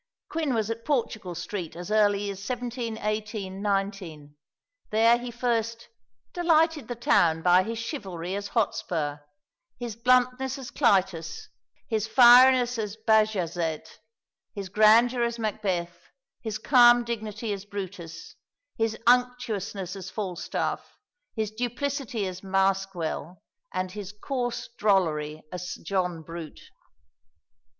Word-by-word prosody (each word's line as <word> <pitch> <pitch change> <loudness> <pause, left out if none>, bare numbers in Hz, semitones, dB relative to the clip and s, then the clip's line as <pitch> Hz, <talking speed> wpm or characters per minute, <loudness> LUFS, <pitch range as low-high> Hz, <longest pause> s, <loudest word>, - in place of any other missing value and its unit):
Quin 310 -6 -1
was 220 0 0
at 230 0 -5
Portugal 220 - -2
Street 180 -1 -5
as 175 +4 -7
early 205 -1 +2
as 195 - -8
1718 220 -5 -3
19. 195 -7 -3 0.5
There 230 +2 +4
he 245 0 -6
first 230 -1 -2 0.4
"delighted 325 -3 +2
the 245 - -4
town 165 -8 +3
by 180 +1 +6
his 225 +4 -4
chivalry 190 - -5
as 200 0 -3
Hotspur, 165 -10 -1 0.6
his 240 -3 -5
bluntness 255 +2 +2
as 265 -3 -8
Clytus, 195 - +1 0.4
his 220 -2 -1
fieriness 245 +1 +7
as 210 -1 -4
Bajazet, 185 -8 0 0.6
his 200 -2 -5
grandeur 225 +5 +5
as 235 0 0
Macbeth, 195 -6 -3 0.3
his 220 -2 -3
calm 240 0 +6
dignity 220 -2 -4
as 200 0 -7
Brutus, 185 -5 -7 0.5
his 225 0 0
unctuousness 230 -6 +1
as 190 -1 -7
Falstaff, 185 -4 -4 0.4
his 215 -1 -2
duplicity 245 0 -2
as 185 -1 -5
Maskwell, 190 -4 -1 0.3
and 185 0 -3
his 200 -1 -7
coarse 245 +3 -3
drollery 155 -7 +1
as 180 0 -5
Sir - - -8
John 180 -2 -1
Brute." 165 -1 -9
215 Hz, 115 wpm, -27 LUFS, 185-240 Hz, 0.6 s, fieriness